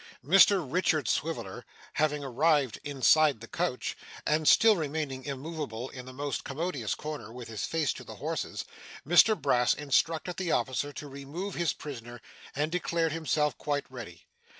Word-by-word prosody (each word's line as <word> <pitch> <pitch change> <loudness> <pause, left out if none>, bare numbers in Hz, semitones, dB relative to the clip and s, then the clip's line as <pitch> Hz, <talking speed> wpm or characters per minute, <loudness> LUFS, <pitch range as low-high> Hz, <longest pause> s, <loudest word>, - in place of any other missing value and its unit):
Mr 190 +2 +6
Richard 155 - +1
Swiveller 150 -5 -2 0.3
having 150 -1 +1
arrived 140 -1 +2
inside 145 -1 +4
the 115 - -10
coach, 170 -5 -2 0.3
and 155 0 +1
still 225 -1 +7
remaining 150 -5 -3
immoveable 140 -4 -5
in 125 -1 -9
the - - -7
most 140 +1 -3
commodious 140 - -2
corner 150 -8 -6
with 125 0 -8
his 110 -2 -3
face 160 -3 0
to - - -9
the - - -10
horses, - - -4 0.4
Mr 190 +6 +6
Brass 125 -4 +3
instructed 160 +4 0
the 180 -3 -1
officer 130 +4 0
to 145 +1 -8
remove 145 +8 -6
his 170 -2 0
prisoner, 120 -4 -8 0.4
and 150 +3 0
declared 170 -2 0
himself 150 -3 0
quite 145 -1 -1
ready. 105 -10 -9
145 Hz, 150 wpm, -29 LUFS, 130-165 Hz, 0.4 s, still